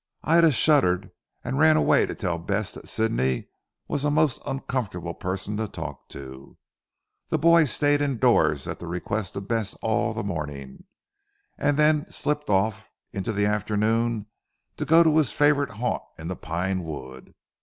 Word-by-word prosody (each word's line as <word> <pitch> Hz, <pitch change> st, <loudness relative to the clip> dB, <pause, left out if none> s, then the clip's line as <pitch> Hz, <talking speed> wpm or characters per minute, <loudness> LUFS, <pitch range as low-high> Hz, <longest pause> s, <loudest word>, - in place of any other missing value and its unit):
Ida 165 Hz, 0 st, +5 dB
shuddered 100 Hz, -, +3 dB, 0.3 s
and 135 Hz, -, -2 dB
ran 155 Hz, 0 st, +6 dB
away -, -, +3 dB
to -, -, -5 dB
tell 90 Hz, -5 st, -2 dB
Bess 100 Hz, +4 st, -2 dB
that -, -, -11 dB
Sidney 65 Hz, -, 0 dB, 0.4 s
was 145 Hz, -, -2 dB
a 150 Hz, -, +2 dB
most 150 Hz, -3 st, +2 dB
uncomfortable 110 Hz, -10 st, -3 dB
person 95 Hz, +3 st, -4 dB
to 110 Hz, 0 st, -2 dB
talk -, -, -8 dB
to. 65 Hz, 0 st, -11 dB, 0.7 s
The -, -, +1 dB
boy 170 Hz, +1 st, +5 dB
stayed 145 Hz, +1 st, +2 dB
indoors 135 Hz, -6 st, +2 dB
at -, -, -5 dB
the 85 Hz, -, -8 dB
request 90 Hz, +4 st, -3 dB
of 100 Hz, 0 st, -6 dB
Bess 110 Hz, -4 st, -1 dB
all 110 Hz, 0 st, -1 dB
the 120 Hz, -, -3 dB
morning, 75 Hz, -8 st, -6 dB, 0.7 s
and 145 Hz, -1 st, 0 dB
then 150 Hz, 0 st, +3 dB
slipped 150 Hz, -2 st, -2 dB
off 100 Hz, +1 st, 0 dB, 0.2 s
in 100 Hz, -, -3 dB
the 100 Hz, +1 st, 0 dB
afternoon 110 Hz, +2 st, 0 dB, 0.5 s
to -, -, -2 dB
go 165 Hz, +1 st, +6 dB
to 160 Hz, -1 st, +3 dB
his 155 Hz, -4 st, +3 dB
favourite 145 Hz, -1 st, +2 dB
haunt 120 Hz, +4 st, -2 dB, 0.2 s
in 80 Hz, +1 st, -7 dB
the 95 Hz, -, -3 dB
pine 90 Hz, +3 st, -2 dB
wood. 65 Hz, -5 st, -9 dB
110 Hz, 160 wpm, -25 LUFS, 90-145 Hz, 0.7 s, ran